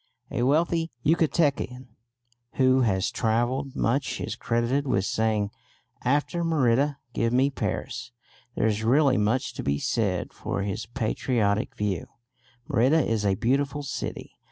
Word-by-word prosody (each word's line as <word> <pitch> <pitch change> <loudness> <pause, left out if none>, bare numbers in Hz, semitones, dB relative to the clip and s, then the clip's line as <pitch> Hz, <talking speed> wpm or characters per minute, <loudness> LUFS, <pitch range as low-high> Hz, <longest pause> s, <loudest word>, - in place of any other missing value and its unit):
A - - -1
wealthy 165 +5 +2 0.2
Yucatecan 145 -5 +1 0.6
who 130 0 +4
has 95 -4 +1
travelled 120 +5 0
much 130 +5 0
is - - -3
credited 120 +5 0
with 95 -6 +1
saying, 110 -2 0 0.5
"After 145 +6 +1
Merida 145 -3 +2 0.2
give 115 -1 +1
me 130 +3 +3
Paris." 125 -1 -4 0.4
There - - +1
is 110 0 0
really 135 +3 +4
much 110 +5 0
to - - -5
be 70 +1 0
said 95 +2 -1
for 100 - -3
his 105 +3 -3
patriotic 115 -3 0
view. 100 -4 -2 0.6
Merida 140 +3 +3
is 115 -2 0
a 100 -2 +2
beautiful 140 +6 0
city. 140 - -5
125 Hz, 130 wpm, -26 LUFS, 110-140 Hz, 0.6 s, who